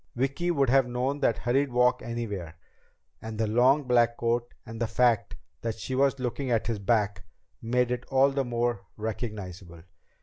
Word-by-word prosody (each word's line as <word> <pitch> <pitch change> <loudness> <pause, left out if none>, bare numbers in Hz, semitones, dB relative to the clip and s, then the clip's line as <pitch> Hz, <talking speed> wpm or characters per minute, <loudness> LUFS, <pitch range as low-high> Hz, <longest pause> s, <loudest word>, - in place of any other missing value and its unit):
Vicki 135 +8 -1
would 140 -7 +2
have 135 -1 +4
known 125 +4 -1
that 120 -5 +2
hurried 135 +3 +1
walk 125 +1 +3
anywhere, 105 -8 -5 0.7
and 110 -1 -6
the 110 - +1
long 125 +7 +4
black 120 -2 +3
coat, 120 +1 -1
and 115 0 -8
the 115 - +1
fact 115 -1 +2 0.3
that 115 -1 -3
she 115 +4 -5
was 140 +1 +2
looking 130 +1 -3
at 115 -3 +1
his 115 -3 -2
back, 100 -2 0 0.4
made 125 +1 +1
it 125 0 -2
all 135 +1 +3
the 135 0 0
more 120 -3 -2
recognizable. 100 -6 -6
120 Hz, 170 wpm, -27 LUFS, 110-130 Hz, 0.7 s, have